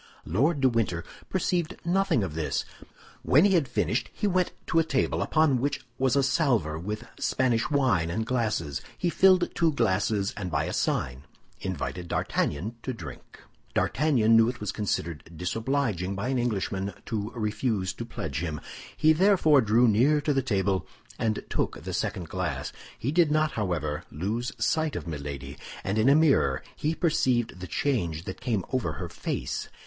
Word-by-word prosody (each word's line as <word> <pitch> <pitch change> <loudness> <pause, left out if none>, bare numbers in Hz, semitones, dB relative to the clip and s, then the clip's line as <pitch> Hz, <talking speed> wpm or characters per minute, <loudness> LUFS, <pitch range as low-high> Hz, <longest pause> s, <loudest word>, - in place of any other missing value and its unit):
Lord 145 +3 +1
de 135 - +5
Winter 105 -8 0 0.3
perceived 180 -2 0
nothing 175 - +2
of 90 -5 -4
this. 80 -1 -1 0.6
When 150 +8 +5
he 200 - +4
had 165 -7 +3
finished, - - 0
he 210 - -3
went 185 -2 +2
to 165 - +2
a - - +4
table 140 -4 0
upon 155 -6 +2
which 140 -1 -2
was 130 -1 +2
a 140 - +3
salver 120 - +1
with 105 +6 -5
Spanish 125 -2 +1
wine 125 - +2
and 110 +6 -1
glasses. 110 - -1 0.2
He 175 - 0
filled 185 -1 +4
two 165 -2 +2
glasses, 100 -4 +1
and 95 -3 -4
by 75 -2 0
a - - -3
sign 65 +2 -1 0.3
invited 90 0 -4
D'Artagnan 100 +7 -1
to 130 - -3
drink. 80 -10 -10 0.3
D'Artagnan 125 -6 +3
knew 115 +1 +6
it 125 - -6
was 105 -1 -2
considered 85 -6 -3
disobliging 105 - -1
by 100 +6 -2
an 130 -2 +1
Englishman 100 -4 -1
to 105 -1 -2
refuse 105 -3 -1
to - - -6
pledge - - -4
him. 80 -3 -3 0.4
He 155 0 +5
therefore 165 -5 +5
drew 115 +2 +4
near 130 +8 +4
to 145 0 +1
the 135 - +2
table 100 -6 0 0.3
and 110 -1 -1
took - - -2
the - - -5
second 90 -3 -2
glass. - - -3 0.2
He 130 - -2
did 165 -1 +4
not, 155 0 +2
however, 85 - -2
lose 110 - -2
sight 155 -1 +1
of - - -4
Milady, 70 -3 -6 0.3
and 100 +3 0
in 115 +5 +5
a 140 - +6
mirror 155 -3 +3
he 155 +2 -1
perceived 125 - +1
the 90 - -6
change 85 - -1
that 95 +5 -7
came 115 -7 -1
over 110 -12 0
her - - -5
face. - - -4
115 Hz, 170 wpm, -27 LUFS, 95-145 Hz, 0.6 s, knew